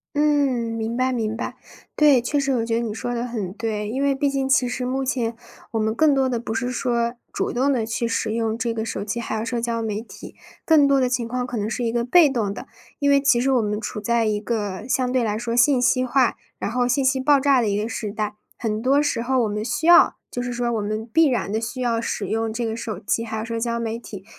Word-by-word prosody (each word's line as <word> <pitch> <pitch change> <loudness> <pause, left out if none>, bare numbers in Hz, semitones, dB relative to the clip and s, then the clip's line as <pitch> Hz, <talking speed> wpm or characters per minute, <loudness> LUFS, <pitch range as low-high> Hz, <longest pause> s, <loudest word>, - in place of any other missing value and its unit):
嗯， 285 -6 +2
明 225 +1 -3
白 255 +1 +1
明 225 -3 -1
白。 - - -4 0.4
对， 290 -5 +5
确 285 +5 0
实， 275 -1 0
我 230 -2 0
觉 230 0 0
得 230 - +1
你 225 -3 -3
说 245 +2 -4
得 240 0 -2
很 215 -7 -4
对。 215 -1 -3
因 260 +5 -2
为 280 -1 +2
毕 285 +1 +1
竟 275 -1 -1
其 260 -2 +3
实 250 +1 -3
目 265 +2 -1
前， 235 -3 -1 0.4
我 225 - -1
们 220 0 0
更 300 +5 +4
多 265 -1 +2
的 245 -2 -1
不 225 -1 -5
是 245 +2 -2
说 235 -2 0 0.2
主 - - -2
动 265 +3 +1
地 240 -5 0
去 230 +1 -2
使 225 -1 -1
用 225 -1 -1
这 230 0 -1
个 220 -1 -3
手 210 -3 -4
机， 215 +3 -3
还 225 -1 -3
有 220 - -3
社 235 0 -2
交 230 -1 -1
媒 215 -1 -2
体， 230 - -12 0.3
更 305 -3 +5
多 280 -1 +4
的 255 - +2
情 245 -2 -1
况 250 +1 -2
可 250 - -6
能 210 0 -2
是 245 - -3
一 230 - 0
个 235 0 0
被 310 +5 +5
动 230 -7 -1
的。 - - -9 0.3
因 285 - +2
为 280 0 +5
其 265 -3 +4
实 265 +3 +1
我 255 -3 +3
们 210 -1 -2
处 215 -1 -5
在 230 +2 +1
一 210 -1 0
个 210 -1 -3
相 255 -1 0
对 255 -1 +2
来 210 -2 -1
说 235 +1 -3
信 250 +2 +4
息 255 +1 +2
化， 255 -1 +2 0.2
然 - - -3
后 245 +1 +1
信 250 +3 +1
息 265 0 +2
爆 285 +1 +4
炸 270 -2 +3
的 225 - 0
一 200 0 0
个 215 - -2
时 220 -2 -4
代。 210 0 -3 0.3
很 215 -2 -2
多 270 +4 +3
时 275 -5 0
候 255 +1 +1
我 - - +1
们 210 0 -3
需 245 +7 -2
要 345 +1 +7 0.2
就 245 - -3
是 245 0 -3
说 240 0 -1
我 220 - -1
们 215 +2 -3
必 325 0 +5
然 245 -6 -1
地 220 - 0
需 230 +3 -5
要 235 -2 0
使 215 -3 -3
用 225 +3 -1
这 235 +2 -3
个 225 0 -2
手 225 -3 -5
机， 225 +3 -1
还 220 -1 -5
有 220 - -3
社 230 0 -3
交 235 0 -1
媒 230 0 -3
体 200 -5 -10
235 Hz, 295 characters per minute, -23 LUFS, 225-260 Hz, 0.4 s, 要